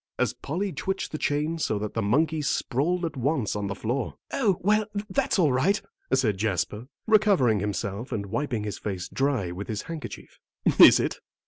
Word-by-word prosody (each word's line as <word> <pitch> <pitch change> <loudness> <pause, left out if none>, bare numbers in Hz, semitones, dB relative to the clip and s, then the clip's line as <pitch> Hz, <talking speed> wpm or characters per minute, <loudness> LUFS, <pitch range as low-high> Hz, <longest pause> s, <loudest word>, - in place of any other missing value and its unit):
as - - +1
Polly 185 +6 -3
twitched 190 0 -3
the 155 - -4
chain 150 +3 0
so 110 - 0
that 105 0 -4
the 115 - -1
monkey 155 +9 +1
sprawled 160 +5 0
at 160 -2 -4
once 135 -4 0
on 105 -1 -2
the 100 - -3
floor. 120 +5 -2 0.2
"Oh, 205 -10 +2
well, 210 +2 +2 0.2
that's - - +1
all 160 -7 +4
right," 185 +11 +2 0.3
said 115 -7 +2
Jasper, 105 +2 -1 0.2
recovering 195 - +4
himself 100 +4 -3
and 100 -2 -2
wiping 115 +2 -2
his 105 -3 -4
face 95 -3 -4
dry 130 -10 0
with 95 +3 -6
his 110 -2 -3
handkerchief. 165 -2 -8 0.4
"Is - - +10
it?" - - -2
130 Hz, 180 wpm, -26 LUFS, 105-165 Hz, 0.4 s, Is